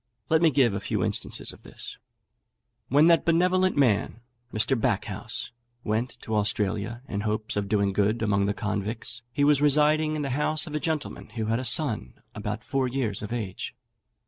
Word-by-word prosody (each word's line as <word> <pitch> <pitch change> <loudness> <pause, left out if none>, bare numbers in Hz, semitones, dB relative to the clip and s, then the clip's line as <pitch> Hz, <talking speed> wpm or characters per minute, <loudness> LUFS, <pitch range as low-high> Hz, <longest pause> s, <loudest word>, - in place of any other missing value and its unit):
Let 160 0 +4
me 165 - +6
give 130 -7 +3
a 100 - -1
few - - -1
instances - - -1
of - - -16
this. - - -8 0.9
When 145 +4 +5
that 170 -1 +5
benevolent 180 +2 +3
man, 115 -3 +2 0.3
Mr. 110 +5 +1
Backhouse, 115 -1 -2 0.3
went 115 +4 -1
to 110 - -3
Australia, 105 +2 -1
in 100 -4 -3
hopes 110 0 -1
of 100 -1 -2
doing 100 -2 +2
good 105 +3 +1
among 100 -2 +2
the 100 - 0
convicts, 105 +3 -3
he 145 - 0
was 145 -1 +4
residing 150 +1 +3
in 150 - -2
the 135 - -2
house 150 +3 +1
of 155 - -8
a 150 - 0
gentleman 155 -7 -3
who 110 -2 -1
had 115 +2 +1
a - - -3
son 115 - +1 0.2
about 105 +1 -4
four 135 -2 0
years 125 -6 -2
of 105 - -6
age. 110 -6 -4
120 Hz, 180 wpm, -26 LUFS, 105-150 Hz, 0.9 s, me